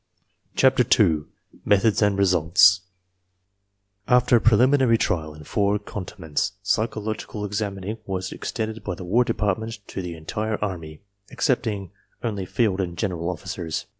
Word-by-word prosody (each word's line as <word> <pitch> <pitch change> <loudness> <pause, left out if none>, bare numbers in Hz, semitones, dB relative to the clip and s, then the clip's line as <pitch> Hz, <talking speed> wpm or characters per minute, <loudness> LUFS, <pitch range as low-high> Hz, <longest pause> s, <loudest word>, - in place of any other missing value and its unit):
CHAPTER 130 -1 +4 0.2
II 80 -8 +3 0.4
METHODS 105 +2 +3
AND 105 -2 +3
RESULTS 90 0 +5 0.6
* 100 0 -48
After 125 -1 +4
preliminary 120 +2 +4
trial 80 -7 -1
in 75 - -12
four 100 +4 +1
cantonments 95 -3 -4
psychological 110 0 -2
examining 100 +1 -3
was 95 -1 -3
extended 110 0 -4
by 90 - -3
the 90 - -8
War 115 +8 +3
Department 110 -1 -1
to - - -4
the 90 -2 -6
entire 105 +7 -3
Army, 85 -6 -5 0.3
excepting 110 - -1 0.3
only 100 -5 -3
field 100 -4 +1
and 85 -2 -4
general 85 -4 -2
officers. 85 -1 -4
100 Hz, 130 wpm, -24 LUFS, 90-110 Hz, 0.6 s, RESULTS